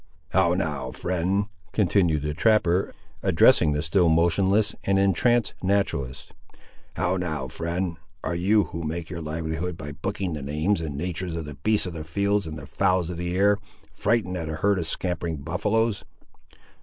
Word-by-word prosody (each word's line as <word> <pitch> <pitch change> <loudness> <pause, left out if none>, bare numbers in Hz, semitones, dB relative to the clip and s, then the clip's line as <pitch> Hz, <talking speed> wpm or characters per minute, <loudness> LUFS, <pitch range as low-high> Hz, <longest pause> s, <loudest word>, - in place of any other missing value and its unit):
"How 90 -1 +3
now, 75 -8 -2
friend," 95 +7 -1 0.3
continued 85 -7 +2
the 75 0 -1
trapper, 95 0 +2 0.3
addressing 75 - +5
the 75 +1 -1
still 85 +1 +3
motionless 95 +6 +3
and 100 0 +2
entranced 105 +4 +3
naturalist; 90 -9 -1 0.6
"how 90 +2 0
now, 80 -7 -3
friend; 85 +3 -3 0.3
are 80 - -1
you, 100 +5 +3
who 85 0 -6
make 80 +1 -4
your 85 -2 -5
livelihood 80 +2 -3
by 75 -3 -6
booking 95 +3 -3
the 75 - -4
names 75 +7 0
and 75 -4 -4
natur's 90 +1 -3
of 80 -2 -4
the 75 - -7
beasts 105 +11 +1
of 90 - -5
the 80 -2 -5
fields 100 +4 0
and 80 0 -6
the 70 - -8
fowls 90 +4 +1
of 85 - -6
the 90 +1 -2
air, 100 +1 +4 0.3
frightened 100 -6 0
at 80 -3 -4
a 80 - -3
herd 100 +5 +2
of 80 - -3
scampering 85 -2 -2
buffaloes? 105 +8 0
85 Hz, 170 wpm, -25 LUFS, 80-95 Hz, 0.6 s, addressing